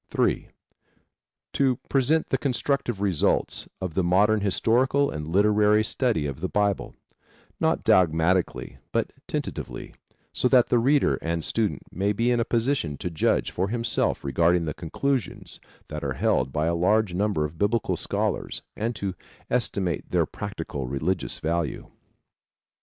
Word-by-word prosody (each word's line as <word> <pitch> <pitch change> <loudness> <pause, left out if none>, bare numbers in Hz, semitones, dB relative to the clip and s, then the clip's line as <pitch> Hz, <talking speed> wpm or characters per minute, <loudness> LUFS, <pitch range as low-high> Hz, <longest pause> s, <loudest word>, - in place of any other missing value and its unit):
(3) - - 0 1.1
To 135 -2 +2
present 145 +4 +2
the 135 - +2
constructive 125 -4 -1
results 95 -6 +1
of 90 -3 -4
the 95 - +1
modern 100 +5 +3
historical 125 +8 +2
and 75 0 -5
literary 105 +4 +4
study 110 - 0
of 70 -1 -4
the 95 - -2
Bible, 100 -2 0 0.6
not - - +1
dogmatically 85 +1 +2
but - - -1
tentatively, - - -5 0.4
so - - +2
that 125 -1 +4
the 120 - +4
reader 140 +4 +3
and 85 -1 -1
student 110 -3 -1
may 100 +4 0
be 115 +4 +1
in 120 - +2
a - - +3
position 115 - 0
to 90 - -4
judge 80 - +1
for 95 +2 -1
himself 115 0 0
regarding 85 +5 +2
the 75 - -3
conclusions 125 - -3 0.3
that - - -5
are - - -1
held 65 +1 +1
by 75 +3 0
a 85 - +1
large 95 +3 +2
number 95 -4 0
of 75 +2 -8
Biblical 105 +2 +1
scholars - - -2
and 115 +2 -2
to 100 -1 -3 0.4
estimate 100 - -1
their - - +2
practical 70 -3 -5
religious 80 +8 -2
value. 80 -2 -2
100 Hz, 145 wpm, -25 LUFS, 85-115 Hz, 1.1 s, literary